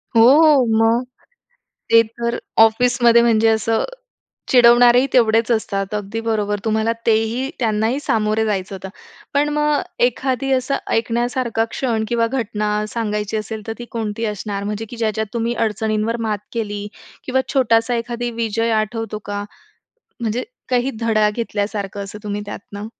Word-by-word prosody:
हो. 275 Hz, +4 st, +6 dB, 0.2 s
मग 230 Hz, +2 st, +3 dB, 0.9 s
ते 230 Hz, 0 st, +8 dB, 0.2 s
तर 235 Hz, 0 st, -1 dB, 0.2 s
ऑफिसमध्ये 235 Hz, +1 st, +5 dB
म्हणजे 225 Hz, -1 st, +3 dB
असं 220 Hz, 0 st, +1 dB, 0.7 s
चिडवणारेही 245 Hz, +1 st, +6 dB
तेवढेच 225 Hz, -2 st, +3 dB
असतात. 200 Hz, -3 st, -1 dB
अगदी 210 Hz, +2 st, -4 dB
बरोबर 210 Hz, -2 st, 0 dB
तुम्हाला 220 Hz, +1 st, +1 dB
तेही 225 Hz, +4 st, +1 dB
त्यांनाही 225 Hz, +2 st, 0 dB
सामोरे 220 Hz, -5 st, 0 dB
जायचं 195 Hz, -2 st, -2 dB
होतं. 190 Hz, 0 st, -8 dB, 0.4 s
पण 290 Hz, +1 st, +2 dB
मग 300 Hz, 0 st, +1 dB, 0.2 s
एखादी 260 Hz, +2 st, -1 dB
असं 260 Hz, +1 st, 0 dB
ऐकण्यासारखा 235 Hz, 0 st, 0 dB
क्षण 230 Hz, -4 st, -1 dB
किंवा 230 Hz, 0 st, +1 dB
घटना 225 Hz, -4 st, -2 dB, 0.2 s
सांगायची 210 Hz, -2 st, -2 dB
असेल, 215 Hz, +1 st, -5 dB
तर 225 Hz, -, -2 dB
ती 240 Hz, -, -6 dB
कोणती 225 Hz, -1 st, -3 dB
असणार? 205 Hz, -1 st, -4 dB
म्हणजे 210 Hz, +2 st, -4 dB
की 240 Hz, -, -9 dB
ज्याच्यात 220 Hz, -1 st, -1 dB
तुम्ही 235 Hz, 0 st, -1 dB
अडचणींवर 220 Hz, 0 st, -1 dB
मात 210 Hz, -1 st, -1 dB
केली. 205 Hz, -3 st, -3 dB, 0.4 s
किंवा 260 Hz, 0 st, +1 dB
छोटासा 240 Hz, -2 st, +2 dB
एखादा 235 Hz, +1 st, -3 dB
विजय 230 Hz, 0 st, -1 dB
आठवतो 215 Hz, 0 st, -3 dB
का? 205 Hz, 0 st, -4 dB, 0.8 s
म्हणजे 230 Hz, +1 st, -2 dB, 0.2 s
काही 250 Hz, +1 st, +1 dB
धडा 215 Hz, -2 st, +2 dB
घेतल्यासारखं 205 Hz, -2 st, -3 dB
असं 200 Hz, +2 st, -9 dB
तुम्ही 205 Hz, -1 st, -3 dB
त्यातनं. 205 Hz, 0 st, -8 dB
225 Hz, 135 wpm, -20 LUFS, 215-240 Hz, 0.9 s, ते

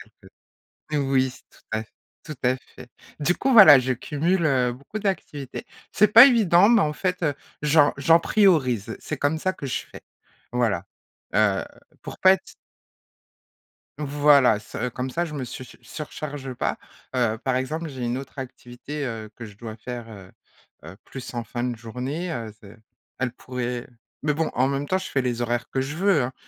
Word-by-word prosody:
quelques -, -, -18 dB, 0.6 s
Oui, 150 Hz, -, +1 dB
oui, 135 Hz, -2 st, +2 dB
c'est -, -, -16 dB
tout -, -, -23 dB
à 110 Hz, -, -1 dB
f 110 Hz, -, -24 dB, 0.3 s
tout 155 Hz, -, -7 dB
à 125 Hz, +1 st, +3 dB
fait. -, -, -15 dB, 0.3 s
Du 150 Hz, +4 st, +2 dB
coup 270 Hz, -, 0 dB
voilà, 155 Hz, -, +10 dB
je 130 Hz, 0 st, 0 dB
cumule, 165 Hz, +7 st, 0 dB
heu, 125 Hz, -4 st, +2 dB
beaucoup 140 Hz, -, -8 dB
d'activités. 155 Hz, -9 st, -4 dB, 0.3 s
C'est 210 Hz, 0 st, +4 dB
pas 230 Hz, +4 st, +10 dB
évident, 205 Hz, -6 st, +5 dB
mais 230 Hz, -3 st, +5 dB
en 150 Hz, 0 st, 0 dB
fait, 180 Hz, 0 st, -1 dB, 0.4 s
j'en 150 Hz, 0 st, +5 dB
j'en 165 Hz, +4 st, +5 dB
priorise, 130 Hz, -, +2 dB
c'est 155 Hz, -, -5 dB
comme 145 Hz, +3 st, 0 dB
ça 185 Hz, +3 st, 0 dB
que 140 Hz, -, -8 dB
je 130 Hz, -, -2 dB
fais, -, -, -11 dB, 0.5 s
voilà, 110 Hz, -7 st, 0 dB, 0.5 s
heu, 100 Hz, -3 st, +2 dB, 0.4 s
pour -, -, -8 dB
pas 190 Hz, 0 st, +7 dB
être 190 Hz, -, -7 dB, 1.4 s
Voilà, 145 Hz, -5 st, +4 dB
ça 125 Hz, +3 st, -5 dB
comme 130 Hz, +2 st, -4 dB
ça 170 Hz, +6 st, -1 dB
je 160 Hz, -, -6 dB
me 135 Hz, -4 st, -4 dB
su 130 Hz, -, -8 dB, 0.2 s
surcharge 145 Hz, -3 st, -7 dB
pas. -, -, -2 dB, 0.4 s
Heu, 115 Hz, -3 st, +1 dB
par 130 Hz, +2 st, -1 dB
exemple, 155 Hz, +6 st, -2 dB
j'ai 130 Hz, -4 st, -6 dB
une 120 Hz, +1 st, -1 dB
autre 135 Hz, +1 st, -8 dB
activité, 130 Hz, +3 st, -7 dB
heu, 110 Hz, -3 st, -5 dB
que 115 Hz, -, -7 dB
je 105 Hz, -, -12 dB
dois 110 Hz, +1 st, -8 dB
faire, 120 Hz, 0 st, -7 dB
heu, 95 Hz, -3 st, -12 dB, 0.5 s
heu 85 Hz, +4 st, -11 dB
plus 130 Hz, -2 st, -9 dB
en 120 Hz, -1 st, -4 dB
fin 120 Hz, +3 st, -4 dB
de 125 Hz, -2 st, -2 dB
journée, 125 Hz, +10 st, -5 dB
heu, 115 Hz, -6 st, -5 dB
ce 100 Hz, +1 st, -14 dB, 0.4 s
elle 125 Hz, -2 st, -1 dB
pourrait 125 Hz, -1 st, -5 dB, 0.4 s
mais 150 Hz, -, +2 dB
bon, 160 Hz, +2 st, -1 dB
en 130 Hz, +1 st, +2 dB
même 140 Hz, +1 st, -2 dB
temps 185 Hz, -, +1 dB
je 190 Hz, -, -6 dB
fais 135 Hz, -, 0 dB
les 120 Hz, -2 st, -2 dB
horaires 120 Hz, 0 st, -2 dB
que 135 Hz, -, -2 dB
je 140 Hz, +3 st, -3 dB
veux, 180 Hz, -6 st, +3 dB
hein, 130 Hz, -, -4 dB
135 Hz, 190 wpm, -24 LUFS, 120-155 Hz, 1.4 s, voilà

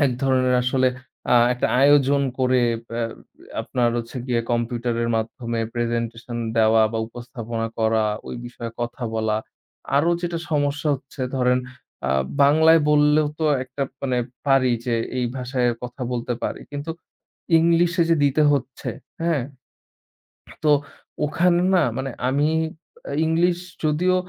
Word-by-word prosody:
এক -, -, 0 dB
ধরনের 130 Hz, -1 st, +2 dB
আসলে 130 Hz, +1 st, +2 dB, 0.4 s
আ -, -, +6 dB, 0.2 s
একটা 125 Hz, -, 0 dB, 0.2 s
আয়োজন 140 Hz, -1 st, +5 dB, 0.2 s
করে 130 Hz, -1 st, +3 dB, 0.3 s
ব্য 115 Hz, -, -8 dB, 0.7 s
আপনার 120 Hz, -1 st, 0 dB
হচ্ছে 120 Hz, +2 st, -5 dB
গিয়ে, 120 Hz, -2 st, +1 dB
কম্পিউটারের 120 Hz, 0 st, -1 dB
মাধ্যমে 115 Hz, +1 st, -3 dB
প্রেজেন্টেশন 120 Hz, 0 st, -3 dB, 0.2 s
দেওয়া 110 Hz, 0 st, +5 dB
বা 115 Hz, -, -1 dB
উপস্থাপনা 115 Hz, -1 st, -5 dB
করা, 110 Hz, -1 st, +2 dB, 0.2 s
ওই -, -, -5 dB
বিষয়ে 120 Hz, -1 st, -7 dB
কথা 120 Hz, +1 st, -4 dB
বলা। 110 Hz, -1 st, 0 dB, 0.6 s
আরো 160 Hz, +5 st, +3 dB
যেটা 170 Hz, -1 st, -2 dB
সমস্যা 145 Hz, 0 st, 0 dB
হচ্ছে 135 Hz, +1 st, -11 dB, 0.2 s
ধরেন, 125 Hz, 0 st, +3 dB, 0.5 s
আ -, -, +1 dB, 0.3 s
বাংলায় 160 Hz, +3 st, +6 dB
বললেও 150 Hz, 0 st, +4 dB
তো 160 Hz, -, -1 dB, 0.2 s
একটা 130 Hz, +2 st, -5 dB, 0.2 s
মানে 130 Hz, -2 st, 0 dB, 0.3 s
পারি 135 Hz, -3 st, +4 dB
যে, 120 Hz, -, +1 dB, 0.2 s
এই 125 Hz, -, +1 dB
ভাষায় 125 Hz, -1 st, 0 dB
কথা 125 Hz, +2 st, -7 dB
বলতে 120 Hz, 0 st, -2 dB
পারি। -, -, -3 dB
কিন্তু 145 Hz, +3 st, -5 dB, 0.7 s
ইংলিশে 170 Hz, +1 st, +3 dB
যে 165 Hz, -, +5 dB
দিতে 145 Hz, +2 st, +3 dB
হচ্ছে, 135 Hz, -2 st, -2 dB, 0.3 s
হ্যাঁ। 165 Hz, -6 st, +1 dB, 1.2 s
তো 150 Hz, -, +4 dB, 0.5 s
ওখানে 175 Hz, +3 st, +2 dB
না 175 Hz, -, +4 dB
মানে, 135 Hz, 0 st, -3 dB, 0.2 s
আমি 145 Hz, +3 st, +2 dB, 0.6 s
আ -, -, -4 dB
ইংলিশ 170 Hz, +2 st, +2 dB, 0.3 s
যদিও 180 Hz, +5 st, +2 dB
130 Hz, 135 wpm, -23 LUFS, 120-150 Hz, 1.2 s, আ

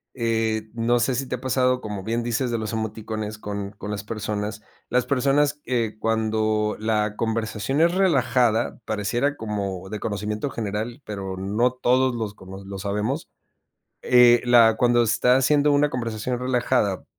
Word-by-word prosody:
Eh, 110 Hz, -2 st, -1 dB
no 120 Hz, +1 st, +2 dB
sé, 125 Hz, +2 st, +1 dB
si 135 Hz, +2 st, -2 dB
te 125 Hz, -, -2 dB
ha 125 Hz, -, -11 dB
pasado, 130 Hz, -1 st, +1 dB
como 105 Hz, -4 st, -5 dB
bien 115 Hz, +3 st, -1 dB
dices, 120 Hz, +1 st, -1 dB
de 115 Hz, -, -1 dB
los 110 Hz, -1 st, -4 dB
emoticones 110 Hz, -1 st, -4 dB
con 100 Hz, -1 st, -5 dB
con 105 Hz, 0 st, -8 dB
las 105 Hz, 0 st, -4 dB
personas. 105 Hz, -1 st, -4 dB, 0.3 s
Las 125 Hz, 0 st, +1 dB
personas, 140 Hz, +2 st, +2 dB
eh, 115 Hz, -3 st, -1 dB
cuando 110 Hz, -1 st, 0 dB
la 105 Hz, -1 st, 0 dB
conversación 115 Hz, +4 st, -1 dB
es 170 Hz, +2 st, +3 dB
relajada, 130 Hz, -, +2 dB
pareciera 120 Hz, +7 st, -1 dB
como 100 Hz, -5 st, -4 dB
de 105 Hz, +1 st, -5 dB
conocimiento 105 Hz, +5 st, -3 dB
general, 110 Hz, +4 st, -4 dB
pero 100 Hz, -3 st, -5 dB
no 105 Hz, +6 st, +1 dB
todos 130 Hz, +1 st, +2 dB
los 110 Hz, -3 st, -4 dB
conos 95 Hz, 0 st, -11 dB
lo 100 Hz, 0 st, -6 dB
sabemos. 105 Hz, -, -2 dB, 0.8 s
Eh, 120 Hz, -1 st, +6 dB
la 115 Hz, -2 st, +6 dB
cuando 120 Hz, +1 st, +3 dB
está 120 Hz, +2 st, +3 dB
haciendo 145 Hz, +2 st, +3 dB
una 145 Hz, +1 st, +3 dB
conversación 115 Hz, 0 st, -3 dB
relajada 125 Hz, -5 st, 0 dB
115 Hz, 155 wpm, -24 LUFS, 105-125 Hz, 0.8 s, Eh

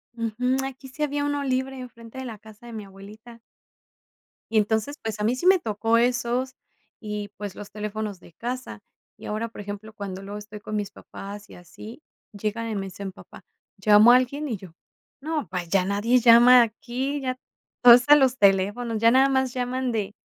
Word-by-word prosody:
Ujú, 240 Hz, +3 st, -1 dB
aquí 265 Hz, 0 st, -8 dB
sí 280 Hz, +4 st, -5 dB
había 290 Hz, 0 st, -1 dB
uno 290 Hz, 0 st, -1 dB
libre 260 Hz, 0 st, -2 dB
enfrente 235 Hz, -1 st, -11 dB
de 260 Hz, -, -6 dB
la 225 Hz, -4 st, -7 dB
casa 220 Hz, +2 st, -16 dB
de 235 Hz, -, -9 dB
mi 215 Hz, -2 st, -7 dB
abuelita. 210 Hz, +4 st, -14 dB, 1.1 s
Y 225 Hz, -, +2 dB
entonces, 220 Hz, +6 st, 0 dB
pues, 220 Hz, -1 st, -4 dB
a -, -, -2 dB
mí 230 Hz, +4 st, +1 dB
sí 255 Hz, -, -5 dB
me 375 Hz, 0 st, +6 dB
tocó 225 Hz, -3 st, 0 dB
esos, 245 Hz, +2 st, 0 dB, 0.4 s
y 210 Hz, -2 st, -5 dB
pues 205 Hz, -2 st, -6 dB
los 205 Hz, -, -10 dB
teléfonos 210 Hz, -1 st, -5 dB
de 175 Hz, -, -18 dB
casa. 250 Hz, -, -6 dB, 0.4 s
Y -, -, -12 dB
ahora, 215 Hz, +2 st, -2 dB
por 220 Hz, -, -10 dB
ejemplo, 205 Hz, +2 st, -8 dB
cuando 195 Hz, -3 st, -6 dB
luego 205 Hz, +1 st, -7 dB
estoy 210 Hz, 0 st, -10 dB
con 215 Hz, +1 st, -6 dB
mis 205 Hz, -2 st, -2 dB
papás 205 Hz, +1 st, -10 dB
y -, -, -13 dB
así, 215 Hz, -, -12 dB, 0.3 s
llega 215 Hz, +3 st, -3 dB
y 220 Hz, -, -3 dB
me 195 Hz, -1 st, -3 dB
dice 200 Hz, +1 st, -8 dB
mi 195 Hz, -, -4 dB
papá: 190 Hz, -, -15 dB, 0.3 s
"¿Llamó 210 Hz, +3 st, +6 dB
alguien?" 255 Hz, +4 st, +2 dB
y 225 Hz, -, -2 dB
yo: 185 Hz, -3 st, -13 dB, 0.5 s
"No, 305 Hz, -, -3 dB
pa, 180 Hz, +1 st, -3 dB
ya 185 Hz, +2 st, +1 dB
nadie 205 Hz, +6 st, +2 dB
llama 240 Hz, +1 st, +8 dB
aquí, 255 Hz, +5 st, -4 dB
ya 255 Hz, -1 st, -3 dB, 0.5 s
todo 245 Hz, -1 st, +11 dB
es 245 Hz, +2 st, +4 dB
a 295 Hz, -, +10 dB
los 260 Hz, -3 st, +3 dB
teléfonos, 205 Hz, +4 st, +2 dB
ya 230 Hz, +1 st, +5 dB
nada 265 Hz, +2 st, +5 dB
más 265 Hz, -2 st, 0 dB
llaman 255 Hz, 0 st, -2 dB
de 210 Hz, -2 st, -3 dB
230 Hz, 200 wpm, -25 LUFS, 205-255 Hz, 1.1 s, todo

